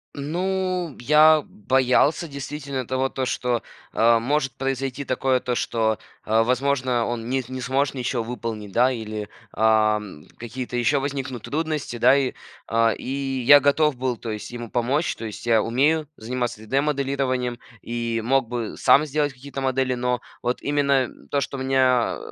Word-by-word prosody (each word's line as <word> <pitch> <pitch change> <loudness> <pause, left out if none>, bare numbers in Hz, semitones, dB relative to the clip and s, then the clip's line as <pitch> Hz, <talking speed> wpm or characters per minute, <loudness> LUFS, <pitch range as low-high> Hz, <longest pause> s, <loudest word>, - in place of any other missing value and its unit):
Ну, 180 +2 -2
я 155 +3 +6
боялся, 130 +8 +2
действительно, 140 -2 -5
того, 130 +1 0
то, 130 -1 -2
что, 125 -1 -1 0.3
а, 115 0 +4
может 135 +2 0
произойти 135 +1 -2
такое, 130 0 +1
то, 125 0 -2
что, 110 -2 0 0.3
а, 110 +1 +3
возможно, 125 -1 +1
он 120 -1 -4
не 130 0 0
не 130 0 -5
сможет 135 +3 0
ничё 125 -2 -2
выполнить, 110 -3 -5
да. 125 +5 +4
Или, 110 -3 -5 0.2
ам, 105 -6 +1
какие-то 125 +1 -5
еще 120 +4 +2
возникнут 135 -4 -4
трудности. 155 -5 -3
Да, 130 +4 +6
и, 135 -2 0 0.3
а, 115 0 +2
и - - -11 0.4
я 145 0 +9
готов 145 0 +3
был, 125 -1 -1
то 115 0 -6
есть, 105 -1 -6
ему 120 -2 -7
помочь. 130 +7 0
То 115 - -6
есть, 110 +2 -8
я 115 -2 +4
умею 145 +6 +1
заниматься 120 +1 -3
3D-моделированием, 135 -2 -1 0.2
и 115 -1 -2
мог 130 -1 +2
бы 120 -3 -4
сам 145 - +5
сделать 145 -1 -1
какие-то 135 +1 -7
модели, 130 -1 0
но, 125 0 -1 0.2
вот 125 +1 -2
именно 140 -3 +2 0.2
то, 140 - +1
что 140 0 -4
меня, 130 -2 +2
130 Hz, 155 wpm, -23 LUFS, 120-140 Hz, 0.4 s, я